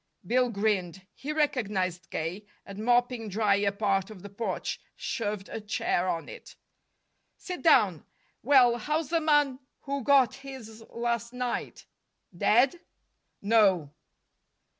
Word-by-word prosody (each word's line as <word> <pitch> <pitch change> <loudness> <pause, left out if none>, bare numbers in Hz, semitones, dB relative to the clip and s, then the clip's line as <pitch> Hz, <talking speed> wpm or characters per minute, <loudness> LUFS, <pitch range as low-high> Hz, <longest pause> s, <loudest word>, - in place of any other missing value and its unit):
Bill 250 +1 +2
grinned. 195 -4 -1
He 290 - -6
recognized 200 - -1
K., 180 +6 -4 0.2
and, 200 +1 -9
mopping 245 -1 +1
dry 200 0 +2
a 200 0 +1
part 195 -2 0
of 200 -4 -12
the 205 - -9
porch, 225 +3 -4
shoved 210 -4 -3
a 225 - -6
chair 185 -3 -1
on 165 -2 -3
it. - - -11 0.8
"Sit 360 -1 -7
down. 200 - +4 0.4
Well, 250 -2 +5
how's 305 +5 -2
the 335 -1 +2
man 295 -4 +2 0.2
who 280 -1 -4
got 265 -3 +4
his 255 -5 -10
last 235 0 -2
night? 250 -1 -4 0.5
Dead?" 250 - +3 0.6
"No." 195 -9 +3
225 Hz, 125 wpm, -28 LUFS, 200-260 Hz, 0.8 s, Well